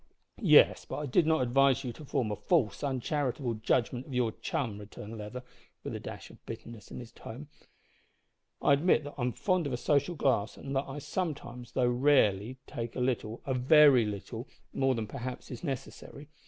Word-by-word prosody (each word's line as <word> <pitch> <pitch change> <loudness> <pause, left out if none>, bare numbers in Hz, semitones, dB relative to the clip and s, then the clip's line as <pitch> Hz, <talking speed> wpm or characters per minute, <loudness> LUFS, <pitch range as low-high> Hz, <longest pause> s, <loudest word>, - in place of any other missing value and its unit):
"Yes, - - +6
but - - -6
I 150 - -3
did 155 +5 +3
not 160 -3 +3
advise 135 +2 +3
you 125 -2 -4
to 155 - -11
form 125 -5 -1
a - - -1
false, 130 - +1
uncharitable 135 -2 -1
judgment 120 +3 0
of 135 - -6
your 120 -3 +2
chum," 110 -2 -3
returned 105 +1 -9
Leather, 110 +4 -7 0.4
with - - -5
a - - -4
dash - - -8
of - - -18
bitterness 115 -3 -9
in - - -8
his 120 -2 -10
tone. 140 +6 -10 1.1
"I 140 - +5
admit 155 +2 +3
that 145 - -7
I'm 125 0 +1
fond 185 - 0
of 135 - -3
a - - 0
social 145 +6 +1
glass, 120 -8 +1
and 135 0 -5
that 135 - 0
I 135 - -6
sometimes, 140 -7 -4
though 125 -2 +2
rarely, 120 -3 +3
take 120 -4 -5
a - - -3
little 125 -3 -1
a 135 - 0
very 130 -1 +6
little 105 +4 -5 0.3
more 135 -1 +2
than, 115 -2 -2
perhaps, 125 +3 -6
is 125 - -7
necessary. 140 0 -6
125 Hz, 190 wpm, -30 LUFS, 115-145 Hz, 1.1 s, Yes